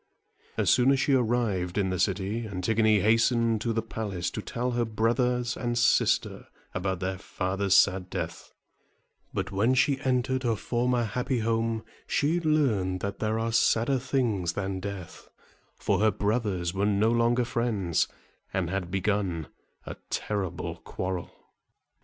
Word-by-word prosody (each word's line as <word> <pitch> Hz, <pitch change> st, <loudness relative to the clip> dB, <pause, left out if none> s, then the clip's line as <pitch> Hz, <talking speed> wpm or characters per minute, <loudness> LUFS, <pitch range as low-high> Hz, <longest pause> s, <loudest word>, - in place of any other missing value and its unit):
As -, -, +3 dB
soon 125 Hz, +1 st, +4 dB
as 135 Hz, -, +2 dB
she 140 Hz, -, +2 dB
arrived 110 Hz, -8 st, +1 dB
in 95 Hz, -2 st, +1 dB
the 90 Hz, -, -2 dB
city, 100 Hz, +5 st, -1 dB
Antigone 105 Hz, +2 st, +2 dB
hastened 115 Hz, +1 st, +3 dB
to 115 Hz, -, 0 dB
the 115 Hz, 0 st, -1 dB
palace 100 Hz, -6 st, -3 dB
to -, -, -4 dB
tell 125 Hz, +4 st, -3 dB
her 120 Hz, 0 st, +1 dB
brothers 120 Hz, +2 st, 0 dB
and 120 Hz, -1 st, -2 dB
sister 120 Hz, +1 st, +2 dB, 0.3 s
about 95 Hz, 0 st, -2 dB
their 95 Hz, 0 st, -2 dB
father's 95 Hz, +1 st, 0 dB
sad 95 Hz, -1 st, +3 dB
death; -, -, -5 dB, 0.8 s
but -, -, -3 dB
when 110 Hz, +7 st, +2 dB
she 135 Hz, +1 st, +2 dB
entered 130 Hz, -1 st, 0 dB
her 120 Hz, -3 st, +1 dB
former 120 Hz, +2 st, 0 dB
happy 125 Hz, +3 st, -1 dB
home, 115 Hz, 0 st, 0 dB, 0.2 s
she 155 Hz, +5 st, +1 dB
learned 120 Hz, -, +1 dB
that 100 Hz, 0 st, -4 dB
there 110 Hz, +1 st, 0 dB
are 115 Hz, +1 st, -1 dB
sadder 120 Hz, +4 st, +3 dB
things 115 Hz, -10 st, 0 dB
than 95 Hz, -1 st, -3 dB
death, 100 Hz, -2 st, -7 dB, 0.5 s
for -, -, 0 dB
her 110 Hz, +1 st, +4 dB
brothers 100 Hz, -5 st, -1 dB
were 100 Hz, +2 st, +1 dB
no 105 Hz, +2 st, +3 dB
longer 120 Hz, +1 st, +2 dB
friends, 115 Hz, -8 st, 0 dB, 0.4 s
and 90 Hz, -2 st, -1 dB
had 95 Hz, -2 st, -2 dB
begun 95 Hz, -4 st, -1 dB, 0.4 s
a -, -, -6 dB
terrible 100 Hz, -4 st, -3 dB
quarrel. 90 Hz, -1 st, -4 dB
110 Hz, 145 wpm, -27 LUFS, 95-120 Hz, 0.8 s, soon